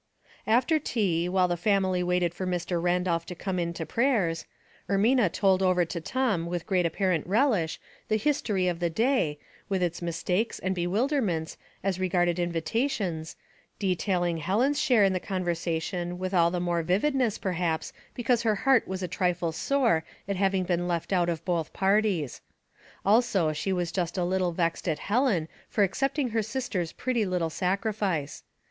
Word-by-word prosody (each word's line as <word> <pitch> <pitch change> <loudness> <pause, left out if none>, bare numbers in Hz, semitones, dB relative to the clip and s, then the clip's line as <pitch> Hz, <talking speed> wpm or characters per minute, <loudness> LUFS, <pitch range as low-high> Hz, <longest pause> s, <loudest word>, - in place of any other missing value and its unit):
After 250 +8 +3
tea, 180 - 0
while 185 0 +3
the 175 - 0
family 190 0 +1
waited 180 -1 +1
for 185 +1 -4
Mr. 175 -1 -1
Randolph 175 -1 +1
to 180 - -6
come 185 +1 -3
in 170 -1 -1
to 165 -1 -5
prayers, 205 - +1 0.4
Ermina 205 0 +3
told 190 -2 +2
over 185 -2 +3
to 170 +1 -5
Tom 195 -3 0
with 175 -1 -3
great 180 -3 +2
apparent 175 -2 0
relish 205 - +1 0.3
the 215 - +1
his 290 +6 +1
tory 190 -4 0
of 175 -2 -1
the 175 -1 +1
day, 220 - +1 0.3
with 190 -2 0
its 175 0 -2
mistakes 180 +5 -1
and 190 0 -2
bewider 220 - +1
ments 165 -7 -2 0.3
as 190 -1 -1
regarded 175 -1 +1
invitations, 175 - -1 0.4
detailing 180 -3 0
Helen's 235 - +1
share 250 -8 +4
in 195 -1 +3
the 185 - 0
conversation 175 -1 -2
with 185 +1 -4
all 170 -2 +4
the 175 +1 -2
more 175 -1 0
vivid 190 - +1
ness 250 -6 +1
perhaps 175 -4 -2 0.2
because 240 -1 +1
lier 220 -2 +2
heart 260 +4 +3
was 190 0 -4
a - - -1
trifle 180 -1 0
sore 230 -3 +1 0.2
at 200 - -1
having 195 0 +1
been 175 -1 -1
left 170 +2 -2
out 175 -2 +2
of 165 -2 -3
both 170 -4 -1
parties. 195 - +1 0.6
Also 200 -7 +3
she 155 +6 -2
was 175 -2 -1
just 175 -1 -2
a 180 - +1
little 185 0 +1
vexed 170 +1 -1
at 155 - 0
Helen 205 - +1 0.2
for 210 - +2
accepting 270 - 0
her 225 0 0
sister's 215 -7 -3
pretty 245 -3 -1
little 180 -4 -1
sacrifice. 190 -5 -1
185 Hz, 170 wpm, -27 LUFS, 170-210 Hz, 0.6 s, share